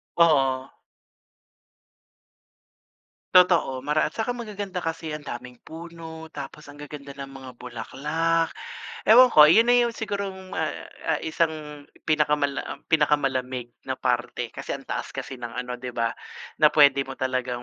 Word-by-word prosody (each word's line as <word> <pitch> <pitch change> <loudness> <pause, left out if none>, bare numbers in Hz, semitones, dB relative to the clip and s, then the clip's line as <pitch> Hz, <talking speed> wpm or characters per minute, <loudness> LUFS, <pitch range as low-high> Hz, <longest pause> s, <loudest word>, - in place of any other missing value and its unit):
Oo. 135 -5 +3 2.6
Totoo, 175 -8 +5
mara 150 +3 +1
at - - -4
saka 225 +2 -1
magaganda 205 -5 -6
kasi 165 0 -3
ang 150 -1 -6
daming 125 -1 -7
puno, 160 -1 -9
tapos 145 +1 -8
ang 145 - -12
gaganda 145 -1 -8
ng 140 -1 -6
mga 135 -1 -10
bulaklak. 150 +8 -1 0.5
Ewan 250 +4 +9
ko, 150 - +9
'yon 225 +10 +6
na 245 - +6
yung 235 - -1
sigurong 200 -3 -4
ah, - - 0 0.3
ah, - - +1
isang 155 -2 -2 0.2
pinakamala 150 -2 +2
um, - - -16
pinakamalamig 130 -5 +1 0.2
na - - -1
parte, - - -1
kasi - - -6
ang - - -7
taas - - -4
kasi 130 - -6
ng 120 -1 -6
ano, 125 0 -4
'di 125 0 -6
ba, 115 -1 0 0.5
na 150 - +6
puwede 140 -2 +5
mo 135 - -6
talagang 130 -2 -2
150 Hz, 145 wpm, -25 LUFS, 130-165 Hz, 2.6 s, Ewan